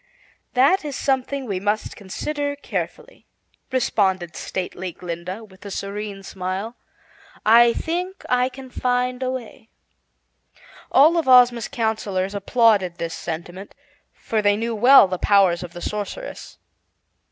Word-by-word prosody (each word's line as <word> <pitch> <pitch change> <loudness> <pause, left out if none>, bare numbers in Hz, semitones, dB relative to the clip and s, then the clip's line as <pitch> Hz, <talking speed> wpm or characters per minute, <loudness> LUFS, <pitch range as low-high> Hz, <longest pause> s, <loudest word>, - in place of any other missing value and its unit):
"That 280 +10 +4
is 290 -3 -5
something 270 0 -1
we 195 -5 -3
must 210 +2 -2
consider 285 +9 -4
carefully," - - -6 0.4
responded 190 -8 0
stately 185 0 -5
Glinda, 180 +5 -6
with 190 -3 -17
a 200 - -7
serene 200 0 -5
smile. 190 +5 -5 0.7
"I 235 +2 +6
think 360 +6 -4
I 250 0 +2
can 260 -1 -12
find 250 0 -1
a 255 - -1
way." 245 -2 -7 1.2
All 310 +5 +6
of 330 - 0
Ozma's 245 -2 +6
counsellors 205 -4 -2
applauded 200 -3 +2
this 165 -1 -4
sentiment, 175 +4 -7 0.4
for 220 -1 -2
they 205 0 +3
knew 230 +1 -2
well 245 +1 +7
the 185 -1 -4
powers 190 -4 +3
of 175 -2 -8
the 175 - -9
Sorceress. 210 - -6
220 Hz, 130 wpm, -22 LUFS, 190-255 Hz, 1.2 s, well